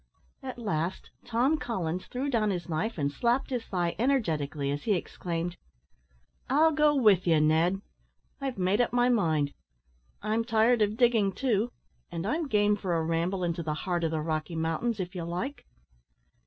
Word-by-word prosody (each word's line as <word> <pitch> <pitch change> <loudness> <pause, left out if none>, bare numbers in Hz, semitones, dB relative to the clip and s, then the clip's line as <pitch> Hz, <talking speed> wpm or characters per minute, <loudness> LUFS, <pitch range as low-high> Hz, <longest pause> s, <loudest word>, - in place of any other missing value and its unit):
At 260 -2 -6
last, 185 -6 -3
Tom 255 +7 +2
Collins 185 - -3
threw 255 +3 -3
down 225 -6 +1
his 180 -3 -3
knife, 180 +7 -2
and 145 -2 0
slapped 240 - 0
his 245 -3 -2
thigh 175 -3 -1
energetically, 155 - 0
as 145 +1 -4
he 215 - +3
exclaimed, 175 -1 -4 0.9
"I'll 310 +5 +5
go 300 -1 +3
with 210 -9 +4
you, 160 -2 +5
Ned! 165 +6 +2 0.6
I've 270 -4 -3
made 190 +4 +2
up 240 - +1
my 245 0 +3
mind. 160 -11 +1 0.7
I'm 220 +2 +1
tired 225 +1 +3
of 210 +1 +1
digging, 230 -5 +3
too; 240 -2 0 0.4
and 170 +1 -4
I'm 310 +8 -1
game 210 -4 +3
for 190 -4 -2
a 165 - +1
ramble 170 +3 -1
into 170 0 -1
the 155 -2 -2
heart 175 +2 -2
of 165 - +2
the 155 -1 -1
Rocky 155 +1 -2
Mountains, 165 +8 -1
if 180 0 -4
you 180 -3 -4
like." 180 +13 -4
195 Hz, 170 wpm, -29 LUFS, 165-240 Hz, 0.9 s, I'll